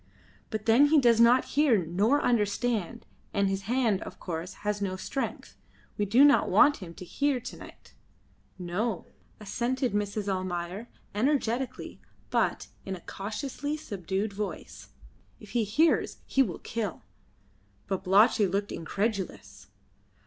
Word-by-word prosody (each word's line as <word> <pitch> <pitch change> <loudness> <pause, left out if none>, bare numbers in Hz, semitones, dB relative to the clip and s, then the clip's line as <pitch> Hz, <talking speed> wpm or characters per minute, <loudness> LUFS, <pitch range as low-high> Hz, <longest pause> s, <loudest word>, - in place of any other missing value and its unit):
"But 215 -1 -4
then 235 +6 +6
he 305 +1 +5
does 235 -3 +4
not 240 +2 +6
hear, 260 - +3
nor 210 - +2
understand, 215 -3 0 0.3
and 200 -1 +2
his 195 0 -1
hand, 235 -6 +2
of - - -9
course, 170 +1 -5
has 205 0 -1
no 190 -2 -1
strength. 270 +8 -4 0.4
We 205 - 0
do 235 +8 +6
not 285 - +4
want 295 -1 +5
him 170 -4 -10
to 180 - -9
hear 280 +7 0
to 250 - -8
night." - - -14 0.6
"No," 185 +4 -2 0.3
assented 245 +3 -1
Mrs. 205 0 -2
Almayer, 185 +2 -3 0.3
energetically, 255 +1 -1 0.3
but - - 0
in 190 - -4
a 175 - -11
cautiously 270 - -4
subdued 200 - -3
voice. 205 0 -6 0.5
"If - - -13
he 240 -2 +1
hears 300 +11 +2
he 270 - +2
will 195 -11 0
kill." 215 -6 -4 0.8
Babalatchi 195 +3 +4
looked 200 +2 -2
incredulous. 195 +4 -4
210 Hz, 135 wpm, -28 LUFS, 195-250 Hz, 0.8 s, then